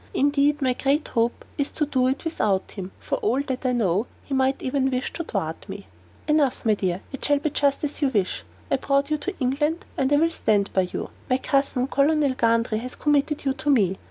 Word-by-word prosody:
Indeed, 285 +1 +2
my 255 -1 +3
great 280 +4 0
hope 235 +1 0
is 285 - 0
to 300 - 0
do 260 -3 +1
it 270 +5 -2
without 205 - 0
him: 190 -2 -7
for - - -2
all 415 - +1
that 265 -2 -4
I - - +2
know, 215 -3 +1 0.2
he 280 - -6
might 265 0 +2
even 265 0 +1
wish 255 0 -2
to 335 - -4
thwart - - -4
me." - - -7 0.4
"Enough, 300 -6 +2
my 220 - +4
dear; 185 -2 -1
it 270 - -7
shall 290 0 +3
be 290 +1 -2
just 280 0 +1
as 295 +1 -3
you 285 - +4
wish. 205 -8 -1 0.3
I - - +3
brought 280 +2 0
you 305 - +1
to 390 +4 -5
England, 295 - 0
and 265 +1 +1
I - - +6
will 330 +3 +3
stand 205 -9 +1
by 185 -2 +1
you. - - -4 0.2
My 255 - +3
cousin, 275 -1 +1
Colonel 285 0 +2
Gundry, 230 -2 +1
has 250 +2 -6
committed 295 0 +1
you 270 - +2
to 295 +2 -3
me. 195 -9 +3
270 Hz, 220 wpm, -24 LUFS, 240-290 Hz, 0.4 s, I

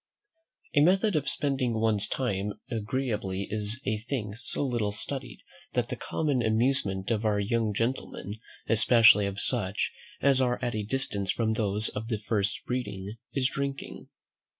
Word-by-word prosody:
A 145 - +5
method 190 +5 +3
of 145 -2 +1
spending 135 -5 +1
one's 110 -2 +2
time 105 -5 -2 0.2
agreeably 105 -4 -2
is 105 +2 +2
a 105 0 0
thing 110 -3 -4
so 120 +5 -3
little 120 -5 -1
studied, - - -3 0.3
that - - 0
the - - -3
common 145 -5 -1
amusement 110 -3 +1
of 110 -1 0
our 105 -2 +1
young 110 +1 0
gentlemen, 110 -2 -3 0.3
especially 110 -2 +6
of 100 0 -4
such 100 -6 -1 0.3
as 135 -1 +3
are 125 -1 +1
at 120 -2 -2
a 110 - -1
distance 105 -4 0
from 110 -1 +1
those 105 -1 +1
of 110 +2 -5
the 115 -2 -1
first 100 -2 -1
breeding, 110 -4 -4 0.2
is 130 -2 +2
Drinking. 140 0 -5
110 Hz, 150 wpm, -28 LUFS, 105-130 Hz, 0.3 s, especially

